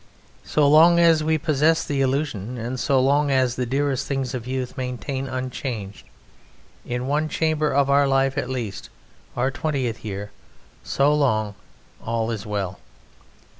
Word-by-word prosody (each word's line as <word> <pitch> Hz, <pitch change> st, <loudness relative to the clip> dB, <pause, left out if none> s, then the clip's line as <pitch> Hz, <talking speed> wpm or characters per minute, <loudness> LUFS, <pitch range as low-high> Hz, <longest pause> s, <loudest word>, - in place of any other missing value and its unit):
So 150 Hz, -2 st, +2 dB
long 165 Hz, +4 st, +7 dB
as 165 Hz, -2 st, +5 dB
we 160 Hz, 0 st, +2 dB
possess 155 Hz, +1 st, +2 dB
the 140 Hz, -2 st, -1 dB
illusion 130 Hz, -4 st, -1 dB
and 120 Hz, +3 st, -4 dB
so 135 Hz, 0 st, +2 dB
long 140 Hz, +3 st, +3 dB
as 130 Hz, -2 st, +2 dB
the 125 Hz, -1 st, -2 dB
dearest 135 Hz, +1 st, -1 dB
things 135 Hz, -2 st, -2 dB
of 125 Hz, -2 st, -5 dB
youth 130 Hz, -1 st, -3 dB
maintain 130 Hz, +1 st, -4 dB
unchanged, 125 Hz, -5 st, -5 dB, 0.8 s
in 125 Hz, +1 st, -3 dB
one 150 Hz, +3 st, 0 dB
chamber 155 Hz, -1 st, 0 dB
of 140 Hz, 0 st, +2 dB
our 140 Hz, 0 st, +4 dB
life 135 Hz, 0 st, +2 dB
at 145 Hz, -, -2 dB
least, 120 Hz, -7 st, -5 dB, 0.5 s
our 130 Hz, +2 st, +1 dB
twentieth 130 Hz, -6 st, -2 dB
year, 105 Hz, -1 st, -5 dB, 0.5 s
so 140 Hz, +2 st, +2 dB
long 110 Hz, -8 st, +1 dB, 0.5 s
all 115 Hz, 0 st, -1 dB
is 110 Hz, -2 st, -5 dB
well. 100 Hz, -3 st, -3 dB
130 Hz, 150 wpm, -23 LUFS, 120-145 Hz, 0.8 s, long